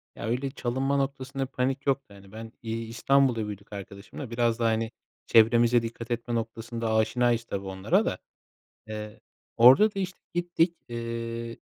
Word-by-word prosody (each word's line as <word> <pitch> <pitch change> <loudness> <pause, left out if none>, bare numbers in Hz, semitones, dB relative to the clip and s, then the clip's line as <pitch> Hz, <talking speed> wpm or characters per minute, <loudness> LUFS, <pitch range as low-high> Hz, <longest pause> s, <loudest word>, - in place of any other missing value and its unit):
Ya, - - -6
öyle 130 +4 -1
çalınma 135 +1 -1
noktasında 135 0 -2
bir - - -35
panik 135 +1 -1
yoktu, 135 -6 0
hani. 100 -1 -15
Ben, 110 +1 -8
iii, 115 0 -4
İstanbul'da 120 -1 +2
büyüdük 105 0 -8
arkadaşımla, 100 +5 -8
biraz 115 0 +1
daha, 115 - +2
hani, 110 0 0 0.3
çevremize 115 +1 +5
dikkat 115 +1 -6
etme 120 0 -2
noktasında 115 0 -3
aşinayız 115 +1 +2
tabii, 100 -4 -5
onlara 95 0 +1
da. - - -1 0.7
Iıı, 105 0 -7 0.4
orada 135 - +7
da, - - -4
işte, 185 0 -4 0.2
gittik, 175 -1 +1
ııı, 115 0 -4
115 Hz, 155 wpm, -27 LUFS, 110-130 Hz, 0.7 s, orada